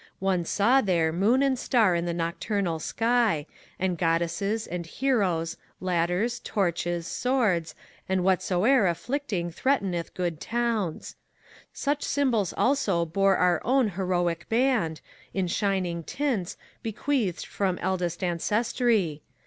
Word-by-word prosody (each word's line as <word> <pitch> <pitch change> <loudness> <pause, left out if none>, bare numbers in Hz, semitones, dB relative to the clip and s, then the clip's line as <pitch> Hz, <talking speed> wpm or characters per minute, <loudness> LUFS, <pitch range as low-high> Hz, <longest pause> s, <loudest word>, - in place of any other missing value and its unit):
One 185 -3 0
saw 235 +10 +3
there 170 -6 +1
moon 220 +10 +3
and 265 -2 +1
star 220 -9 +3
on 170 0 -1
the 175 - -1
nocturnal 170 +1 -1
sky. 225 -4 +1 0.3
And 180 -3 -1
goddesses, 170 +6 0
and 175 0 -4
heroes, 180 -9 0 0.2
ladders, 180 +6 0
torches, 175 -3 -1
swords, 215 -9 0 0.3
And 190 -1 +1
whatsoe'er 190 +5 +3
afflicting 195 - -2
threateneth 190 -6 -1
good 175 -4 -2
towns. 230 -7 -2 0.5
Such 290 0 -1
symbols 240 - +1
also 210 -11 +2
bore 195 +4 +2
our 180 -2 +2
own 255 -2 +3
heroic 175 -3 -1
band, 225 -9 +1 0.3
In 190 -1 +1
shining 180 -2 -1
tints, 235 - -2 0.2
bequeathed 225 - -1
from 190 -3 -1
eldest 180 -1 -2
ancestry. 200 - +1
190 Hz, 115 wpm, -27 LUFS, 170-235 Hz, 0.5 s, saw